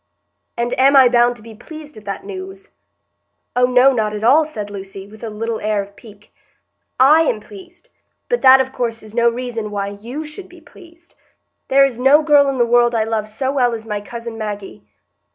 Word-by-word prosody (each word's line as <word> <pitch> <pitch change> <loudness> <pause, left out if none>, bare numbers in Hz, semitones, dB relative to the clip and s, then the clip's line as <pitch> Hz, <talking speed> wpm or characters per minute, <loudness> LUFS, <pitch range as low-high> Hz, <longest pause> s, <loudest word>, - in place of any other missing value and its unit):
"And 240 +1 -2
am 275 +2 +5
I 260 -2 +7
bound 240 0 +3
to 220 - -15
be 225 0 -12
pleased 300 +6 -12
at 215 - -14
that 200 -1 -6
news?" 190 0 -9 0.8
"Oh 250 0 +4
no, 255 +2 +4
not 215 -3 -1
at 210 - -6
all," 290 +7 +4
said 210 -9 -7
Lucy, 195 -1 -9
with 215 +3 -15
a 225 - -4
little 225 +1 -4
air 215 -1 -1
of 200 0 -17
pique. 210 -1 -17 0.7
"I 295 +5 +6
am 240 -9 0
pleased, 355 - -15 0.4
but 485 - -1
that, 265 0 +7
of 265 0 -2
course, 230 -3 -4
is 215 -1 -13
no 235 0 +3
reason 235 -2 -5
why 200 -1 -3
you 235 +10 -8
should 365 +5 -11
be 355 0 -16
pleased. 340 +1 -18 0.5
There 275 +1 +5
is 250 -3 -4
no 280 +4 +4
girl 290 -2 +4
in 270 - -3
the 240 - +3
world 240 0 +2
I 220 - +1
love 220 -1 -3
so 260 +5 -3
well 250 -4 +1
as 220 0 -9
my 210 -2 -4
cousin 230 +1 -8
Maggie." 205 - -6
235 Hz, 205 wpm, -18 LUFS, 215-275 Hz, 0.8 s, I